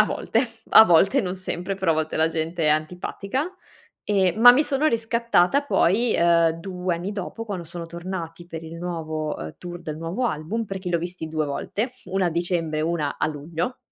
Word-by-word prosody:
A - - +7
volte, 230 +3 0 0.2
a 220 - +10
volte 195 +8 +4
non 185 -5 -3
sempre. 185 0 -3
Però 190 -3 0
a - - 0
volte 155 0 -2
la 160 +1 +3
gente 165 +1 -2
è - - +4
antipatica. 180 - -1 0.5
Ehm, 190 -2 +2
ma 245 +1 +11
mi 270 +4 +4
sono 285 +2 +1
riscattata 230 - +2
poi, 235 -3 +2
uhm, 170 -1 +4
2 180 -1 -2
anni 175 +4 -4
dopo, 210 +3 -5
quando 195 -6 -5
sono 170 +1 -7
tornati 170 -1 -6
per 165 -2 -7
il 165 0 -9
nuovo, 160 -3 -3
uhm, 80 0 -7
tour 175 -1 -8
del 155 -3 -6
nuovo 170 +10 -2
album, 205 +6 -2
perché 190 -2 -5
li 175 - -1
ho - - +3
visti 175 -1 -5
2 155 -1 -1
volte, 205 - -3
1 185 0 0
a - - +1
dicembre, 165 -2 -1
1 155 -3 -1
a - - +1
luglio. 160 - -4
175 Hz, 200 wpm, -24 LUFS, 165-200 Hz, 0.5 s, ma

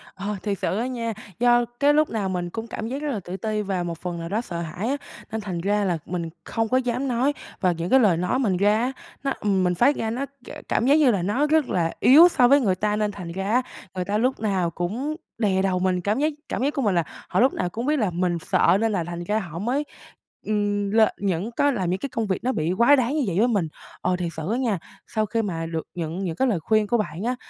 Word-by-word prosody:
Ờ, 200 +2 -3
thiệt 200 -2 -2
sự 195 - -1
á 240 +3 -1
nha, 230 -3 -3 0.3
do 240 0 +4
cái 290 +1 +5
lúc 305 0 +3
nào 205 -4 -2
mình 175 -1 -2
cũng 225 +4 -6
cảm 220 0 -5
giác 270 +4 -4
rất 300 - -2
là 220 - -2
tự 185 0 -7
ti, 215 -1 -2
và 190 -3 -2
một 170 -1 -4
phần 175 -1 -4
nào 165 0 -5
đó 215 +4 0
sợ 170 -7 -5
hãi 175 +8 -4
á, 280 - 0 0.3
nên 220 0 -3
thành 185 -4 -4
ra 205 +3 +1
là 175 -3 +1
mình 170 -2 -3
không 225 -1 -2
có 255 - +3
dám 250 +1 -1
nói. 255 +4 +1 0.3
Và 185 -3 +3
những 170 +1 -3
cái 265 - +6
lời 195 -8 +4
nói 180 +8 0
mình 200 -9 +1
ra 205 +2 +3
á, 255 +2 0 0.3
nó, 275 - 0
ừm, 195 -3 +1
mình 180 0 +1
phát 260 - +4
ra 220 - -2
nó 255 +5 -2
k 275 -2 -18 0.2
cảm 235 - +1
giác 285 +3 +5
như 295 -5 +5
là 195 -5 0
nó 230 +11 +1
rất 310 -2 +2
là 165 -2 +1
yếu 310 +8 +8
so 250 -7 +4
với 280 +3 +5
người 195 -7 +2
ta, 210 +2 0
nên 210 -1 0
thành 180 -4 -7
ra 195 +3 -3
á 250 - +4 0.3
người 180 - -2
ta 205 +2 0
lúc 255 +4 +1
nào 195 -5 0
cũng 230 - -3 0.2
đè 195 -4 +2
đầu 185 -1 +1
mình. 180 -1 +1
Cảm 210 +6 0
giác 305 +2 +1 0.2
cảm 250 - -2
giác 290 - +1
của 275 - -1
mình 205 -6 +1
là 170 - +3 0.3
họ - - +1
lúc 260 +3 +4
nào 180 - -1
cũng 230 +7 -4
biết 300 +1 +2
là 210 -4 +1
mình 175 -1 0
sợ 175 +3 +5
nên 225 -1 +2
là 185 -4 0
thành 175 +1 -5
ra 210 +4 0
họ 170 -5 -6
mới, 250 +8 0 0.6
ừm, 205 -1 0
lên 220 -1 +5
những 195 +3 -1
có 285 +4 +2
làm 190 -8 -1
những 185 +2 -1
cái 275 - -4
công 230 -4 -2
việc 190 - -2
nó 255 - +1
bị 160 -5 -1
quá 235 +8 +6
đáng 260 +2 0
như 295 - +1
vậy 175 - -1
với 235 - +4
mình. 200 -9 +1 0.3
Ờ, 180 0 +1
thiệt 175 -2 -2
sự 160 +4 -4
á 240 - +1
nha, 230 -7 0 0.3
sau 215 -2 0
khi 225 +2 -1
mà 165 -6 -3
được 165 -1 -4
nhận 165 +1 -3
những 165 -3 -2
cái 265 - +2
lời 205 -9 +1
khuyên 215 +5 +2
của 240 - +2
bạn 205 -3 -3
á 250 +2 0
210 Hz, 280 wpm, -24 LUFS, 180-245 Hz, 0.6 s, yếu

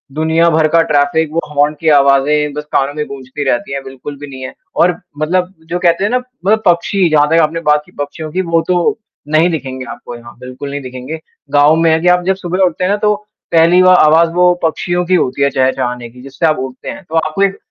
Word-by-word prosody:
दुनिया 160 +2 +2
भर 160 -1 +2
का 165 - +6
ट्रैफ़िक 145 +2 +1
वो 165 - +1
हॉर्न 145 +1 +2
की 160 - +1
आवाज़ें 145 +1 +3
बस 150 - -5
कानों 140 +1 0
में 150 0 -3
गूँजती 135 +1 -7
रहती 120 +3 -1
हैं 140 - -4
बिल्कुल 135 +2 -9
भी 145 - -8
नहीं 130 -1 -9
है 130 - -7 0.2
और 180 - +4 0.3
मतलब 180 +4 -1 0.2
जो 175 +1 -2
कहते 170 +1 +2
हैं 205 - 0
ना 250 - +2
मतलब 250 -4 -1
पक्षी 175 +1 +2
जहाँ 150 -1 +3
तक 165 - +3
आपने 160 +2 -1
बात 150 0 +4
की - - -20
पक्षियों 150 +2 -5
की 185 - -1
वो 165 0 +2
तो 180 +4 +1 0.4
नहीं 165 +3 +4
दिखेंगे 130 -5 -5
आपको 120 - -9
यहाँ 120 0 -13
बिल्कुल 130 +2 -8
नहीं 145 0 -5
दिखेंगे। 130 +4 -7 0.3
गाँव 145 +2 +5
में 165 0 +2
है 160 - +3
कि 180 - 0
आप 180 0 +4
जब 190 +1 +1
सुबह 180 -1 -4
उठते 180 +1 -2
हैं 185 - +1
ना 205 - +1
तो 210 0 +1 0.4
पहली 170 +2 +5
व 185 - +5
आवाज़ 165 -1 +5
वो 180 0 +4
पक्षियों 175 +2 -1
की 185 +1 +2
होती 130 -4 -1
है 140 - +3
चहचाने 125 -2 -1
की 125 +2 -15
जिससे 135 +5 -3
आप 155 -1 +2
उठते 130 -1 -6
हैं। - - -8
तो 160 - -5
आपको 160 +4 0
एक 195 0 0
155 Hz, 235 wpm, -14 LUFS, 140-175 Hz, 0.4 s, का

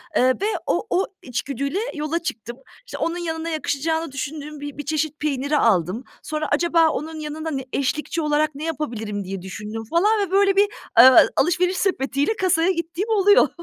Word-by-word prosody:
Eee, - - +4 0.2
ve - - +1 0.2
o - - -1
o 375 +2 +2 0.2
içgüdüyle 275 - -3
yola 305 +2 -2
çıktım. 235 -7 -6 0.3
İşte, - - -7
onun 335 +1 -1
yanına 330 -1 -3
yakışacağını 320 +1 -2
düşündüğüm 295 +2 -6
bi 290 -1 -7
bir 295 - -6
çeşit 310 0 -2
peyniri 285 0 0
aldım. 195 - +2 0.2
Sonra 310 0 -3
"Acaba 330 +1 +3
onun 315 +1 -4
yanında 310 +1 -5
ne 270 -3 -4
eşlikçi 300 +4 -1
olarak 300 -1 +1
ne 290 - -7
yapabilirim?" 225 -11 -3
diye 190 0 -6
düşündüm 210 +4 -6
falan 420 +6 +3
ve 390 -3 -2
böyle 395 0 +4
bir, 405 +1 +5 0.3
eee, 255 +2 +11 0.3
alışveriş 360 +2 +2
sepetiyle 285 0 0
kasaya 365 -2 +2
gittiğim 340 +4 -3
oluyor. 410 -2 +5
310 Hz, 165 wpm, -22 LUFS, 275-340 Hz, 0.3 s, eee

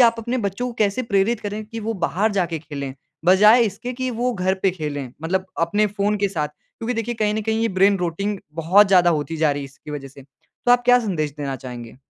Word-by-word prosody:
आप 235 -2 +6
अपने 235 +3 -2
बच्चों 200 +2 -2
को 250 - -4
कैसे 210 +3 +1
प्रेरित 215 0 +1
करें 210 +1 -5
कि 225 +1 -7
वो 225 +1 -2
बाहर 205 +6 +1
जाके 175 -4 -1
खेलें। 140 -3 -6 0.3
बजाए 210 +6 +7
इसके 225 +4 -3
कि 255 +1 -3
वो 245 +1 -1
घर 185 -1 +1
पे 195 - +4
खेलें। 145 -7 -5
मतलब 185 +3 -1
अपने 205 +6 +2
फ़ोन 205 +1 0
के 200 0 +1
साथ। 155 -6 -2
क्योंकि 230 +10 -7
देखिए 230 +1 -2
कहीं 210 -2 0
न 220 - -1
कहीं 220 +1 0
ये 230 - +2
ब्रेन 200 0 +5
रोटिंग 195 +4 -2 0.2
बहुत 175 +6 +5
ज़्यादा 180 -2 +5
होती 160 0 -2
जा 155 -1 +3
रही 145 0 -4
है - - -5
इसकी 140 +2 -12
वजह 145 -2 -6
से। 135 +1 -14
तो 140 - -3
आप 245 0 +4
क्या 245 0 +6
संदेश 170 -10 -2
देना 140 -2 -3
चाहेंगे? 120 -3 -9
195 Hz, 235 wpm, -22 LUFS, 160-220 Hz, 0.3 s, बजाए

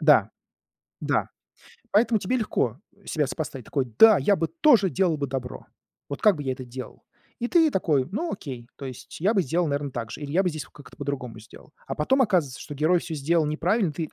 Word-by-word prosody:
Да, - - +5 0.7
да. - - 0 0.6
Поэтому 220 +1 +3
тебе 200 +6 -1
легко 135 - -1 0.3
себя 150 -3 0
сопоставить. 140 -4 -5
Такой: 135 -3 -1
"Да, 220 -2 +9
я 205 -1 +3
бы 165 -2 -1
тоже 245 -11 +5
делал 180 -2 +1
бы 145 - -1
добро! 125 -1 -5 0.4
Вот 140 - -5
как 210 -3 +5
бы 145 - -6
я 135 - -1
это 130 0 -6
делал?" 125 +1 -9 0.4
И 240 - -1
ты 320 0 +4
такой: 150 -8 +1
"Ну, 325 - -2
окей, 125 -10 -7
то - - -11
есть 130 +3 -9
я 200 +6 +3
бы 200 - +3
сделал, 170 +2 0
наверно, 140 -1 -2
так 115 -3 -5
же, - - -7
или 145 0 -5
я 190 +3 +3
бы 180 - +2
здесь 155 -6 -5
вот - - -23
как-то 145 - -15
по-другому 130 -5 -4
сделал". 110 - -15 0.2
А - - -3
потом 265 - +3
оказывается, 170 - 0
что 145 - -8
герой 160 +5 +3
всё 165 -1 -6
сделал 155 +3 +1
неправильно, 170 +4 +1
ты: 160 0 -4
155 Hz, 215 wpm, -25 LUFS, 135-195 Hz, 0.7 s, Да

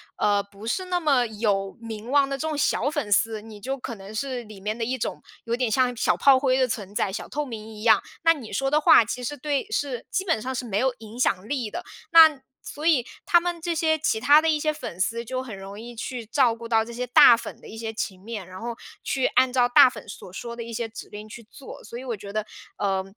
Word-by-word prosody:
呃， 205 -1 +2
不 200 +1 -13
是 370 +11 -1
那 360 -1 0
么 280 -6 +3
有 205 -3 -1
名 225 0 -8
望 280 0 +4
的 275 - -2
这 310 +4 -3
种 310 -2 -2
小 285 -2 +1
粉 295 -9 -3
丝， 220 +1 +2
你 215 -2 -11
就 270 +5 -3
可 245 -2 -6
能 200 0 -10
是 255 +1 -3
里 215 -3 -12
面 210 +3 -3
的 230 - -3
一 255 +3 -1
种 - - -4 0.2
有 230 0 -1
点 250 -1 0
像 250 +2 +2
小 220 - +1
炮 270 -2 +6
灰 260 -1 +2
的 260 -1 +3
存 205 -4 -5
在， 200 -4 0
小 - - -6
透 295 0 -2
明 220 -3 -8
一 210 - -9
样。 220 -3 +5 0.2
那 330 0 +6
你 265 -9 -10
说 270 +7 -1
的 300 +1 +3
话 230 - +7
其 250 +3 -5
实 290 +4 -4
对 285 +3 -2
是， 280 - -2
基 380 - -1
本 325 - +1
上 260 +3 -4
是 250 - -3
没 205 -3 -1
有 260 +1 +1
影 225 +2 -11
响 195 -5 +1
力 250 -4 -2
的。 350 - -6 0.3
那 320 -4 +8 0.2
所 295 - -8
以 270 -8 +4 0.2
他 345 - +5
们 345 -1 -3
这 340 0 -2
些 315 -1 +1
其 280 -7 0
他 290 +6 +6
的 325 - +1
一 305 - +2
些 305 0 0
粉 240 - -8
丝， 230 +5 0
就 255 +2 -4
很 235 -5 -8
容 195 +1 -9
易 240 +1 -9
去 240 0 -5
照 240 0 +2
顾 230 0 -9
到 225 -1 +3
这 230 - -9
些 245 +2 -3
大 245 -1 +7
粉 - - -9
的 - - -13
一 220 - -10
些 225 0 -5
情 195 -3 -4
面， 205 -2 -7
然 185 0 -10
后 235 0 -5 0.3
去 265 -1 0
按 260 -1 +2
照 245 -1 +3
大 245 - +8
粉 250 - -7
所 185 -2 -10
说 235 +4 -6
的 235 - -6
一 230 0 -8
些 230 0 -3
指 220 - -9
令 210 +1 -9
去 230 +1 -11
做。 270 - -11
所 235 - -8
以 - - -8
我 240 -4 -4
觉 200 0 -9
得， 215 0 -1 0.3
呃， 195 -1 0
235 Hz, 285 characters per minute, -25 LUFS, 215-275 Hz, 0.3 s, 那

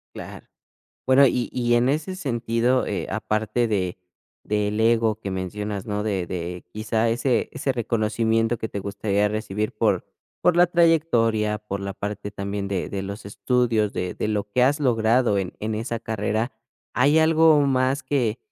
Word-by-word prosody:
Claro, - - -9 0.6
bueno, 135 +1 +6
y 125 -1 0
y 120 -1 +1
en 120 +3 +3
ese 160 +6 -2
sentido, 120 -4 0
eh, - - -3
aparte 110 +2 -1
de 95 -3 -1 0.4
del 105 0 -1
ego 115 -1 +2
que 100 - -5
mencionas, 100 +2 -4
¿no?, 105 0 -2
de 95 -5 -1
de 90 0 -5
quizá, 110 +1 0
ese 120 +1 +1
ese 135 - -1
reconocimiento 115 0 0
que 110 - -4
te 100 - -5
gustaría 100 +1 0
recibir 105 0 -3
por - - 0 0.3
por 175 - +3
la 175 0 +6
trayectoria, 120 -11 +2
por 100 -2 -5
la 100 0 -4
parte 100 +1 -5
también 100 0 -4
de 95 -3 -2
de 95 -1 -4
los 100 +1 -7
estudios, 115 -1 0
de 90 0 -3
de - - -2
lo 105 -1 -1
que 125 +4 +2
has 145 +4 +3
logrado 115 -3 +2
en 95 -2 -3
en 110 +1 -2
esa 115 +1 -3
carrera, 110 +2 -2 0.4
¿hay 145 +5 +4
algo 160 -1 +5
más 135 +1 +1
que 125 -5 0
110 Hz, 165 wpm, -24 LUFS, 105-125 Hz, 0.6 s, bueno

